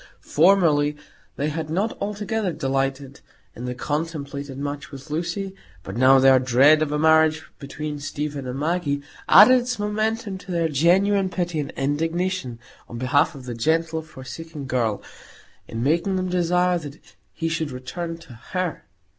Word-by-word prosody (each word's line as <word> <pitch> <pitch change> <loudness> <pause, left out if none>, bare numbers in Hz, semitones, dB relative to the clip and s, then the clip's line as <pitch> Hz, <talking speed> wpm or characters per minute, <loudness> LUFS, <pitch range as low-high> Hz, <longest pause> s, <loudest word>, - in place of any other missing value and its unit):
Formerly 150 -4 +3 0.4
they 145 +2 -1
had 155 0 -4
not 195 +8 -1
altogether 210 0 -2
delighted 135 -2 -2 0.4
in 120 - -7
the 125 0 -4
contemplated 145 -2 -4
match 145 0 -5
with 140 +1 -11
Lucy, 175 +5 -3 0.3
but 95 - -7
now 130 +3 +6
their 130 0 +6
dread 135 +5 +5
of 155 -2 0
a 150 - 0
marriage 160 0 +4 0.2
between 150 +1 -6
Stephen 145 -1 -4
and 125 +1 -4
Maggie 150 -3 -1 0.3
added 235 +6 +8
its 245 0 -3
momentum 210 -1 -2
to 195 - -15
their 170 -2 +1
genuine 190 +6 +3
pity 175 -3 -2
and 145 - -3
indignation 160 -1 -1 0.3
on 120 - -7
behalf 145 +6 +2
of 130 -2 -10
the 125 - -5
gentle 160 +6 0
forsaken 155 +1 -9
girl, 120 -5 -1 0.6
in 115 +1 -4
making 170 +7 +1
them 185 0 -1
desire 180 0 +2
that 145 -2 -9 0.3
he 165 - -3
should 160 -2 -2
return 165 +7 -5
to 165 -7 -14
her. 175 +8 -4
155 Hz, 155 wpm, -23 LUFS, 140-180 Hz, 0.6 s, added